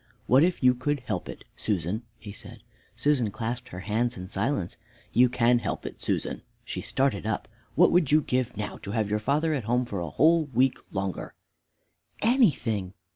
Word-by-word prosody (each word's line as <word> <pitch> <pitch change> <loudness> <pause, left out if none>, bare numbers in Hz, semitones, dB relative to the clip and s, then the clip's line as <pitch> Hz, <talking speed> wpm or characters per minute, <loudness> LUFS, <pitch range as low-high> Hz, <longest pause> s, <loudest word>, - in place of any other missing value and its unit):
"What 130 +5 +5
if 175 -4 +1
you 125 0 +7
could 140 +3 -1
help 125 - -4
it, - - -8
Susan?" 100 +1 -1 0.2
he 105 -3 -9
said. 100 - -12 0.3
Susan 140 -7 +2
clasped 115 +4 -4
her 90 - -7
hands 115 +4 0
in 90 0 -7
silence. 100 -2 -1 0.4
"You 125 +2 +5
can 120 0 +3
help 105 - -4
it, - - -7
Susan." - - -2 0.2
She - - -4
started 130 -6 0
up. 105 - -2 0.3
"What 175 - +6
would 170 -6 +3
you 155 +1 +6
give 125 -5 -1
now 105 0 -4
to 100 - -7
have 110 -3 0
your 105 - +1
father 150 +8 +1
at 130 -7 -2
home 125 +2 +1
for 105 -6 -4
a 85 -2 -3
whole 160 - +4
week 130 -1 +1
longer?" 95 -2 -4 0.8
"Anything! 130 - +2
120 Hz, 180 wpm, -27 LUFS, 105-140 Hz, 0.8 s, you